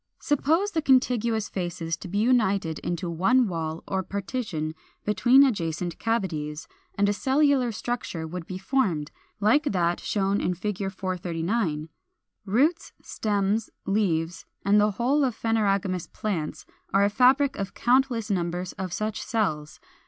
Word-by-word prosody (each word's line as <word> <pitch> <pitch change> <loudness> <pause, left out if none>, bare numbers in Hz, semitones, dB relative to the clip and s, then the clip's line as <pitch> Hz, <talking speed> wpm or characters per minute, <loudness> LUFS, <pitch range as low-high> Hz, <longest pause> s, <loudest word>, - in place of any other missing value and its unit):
Suppose 320 +8 +1
the 325 - 0
contiguous 235 -5 +2
faces 170 -3 -3
to 185 - -9
be 190 +3 -3
united 205 -8 +2
into 175 0 -3
one 195 +9 +3
wall 165 -2 -4
or 190 -1 0
partition 190 -5 -3 0.3
between 240 +7 +5
adjacent 175 - -1
cavities, 160 -10 -2 0.3
and 200 0 +2
a 205 - +2
cellular 265 +1 +2
structure 215 -7 -4
would 165 +1 -6
be 185 - -5
formed, 190 - 0 0.3
like 225 +10 +3
that 175 -8 +1
shown 200 -1 0
in 180 - 0
Fig. 195 +1 -3
439. 175 -2 -2 0.6
Roots, 285 - +1
stems, 205 +1 -1 0.2
leaves, 175 -5 0 0.2
and 205 +1 +5
the 210 - +4
whole 250 +8 +1
of 250 -4 0
phanerogamous 200 -5 0
plants 175 -8 -3 0.3
are 195 +1 +4
a 200 - +4
fabric 260 +5 +4
of 195 -1 -4
countless 240 -3 +2
numbers 180 0 -1
of 185 -2 -5
such 215 +4 -2
cells. 155 -10 -2
200 Hz, 135 wpm, -26 LUFS, 175-240 Hz, 0.6 s, between